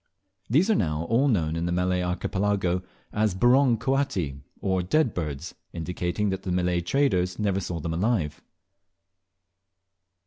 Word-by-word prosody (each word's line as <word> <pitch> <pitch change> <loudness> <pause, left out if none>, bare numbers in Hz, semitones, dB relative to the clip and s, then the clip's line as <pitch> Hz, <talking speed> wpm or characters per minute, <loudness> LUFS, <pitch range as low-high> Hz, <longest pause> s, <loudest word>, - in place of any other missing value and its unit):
These 165 - +4
are - - +4
now 75 -2 0
all 130 +5 +4
known 80 - +1
in 85 +1 -1
the - - -1
Malay 90 +1 +1
Archipelago 95 0 0 0.3
as 105 -2 +1
"Burong 120 +3 +4
coati," 105 - -1 0.2
or 95 -1 0
dead 125 - +2
birds, 75 -1 -4 0.2
indicating 90 +4 -2
that 95 0 -2
the 95 - -4
Malay 90 -1 +1
traders 90 -4 +1
never 100 -2 0
saw 90 -2 -4
them 80 +1 -3
alive. 90 -5 0
90 Hz, 140 wpm, -26 LUFS, 85-110 Hz, 0.3 s, These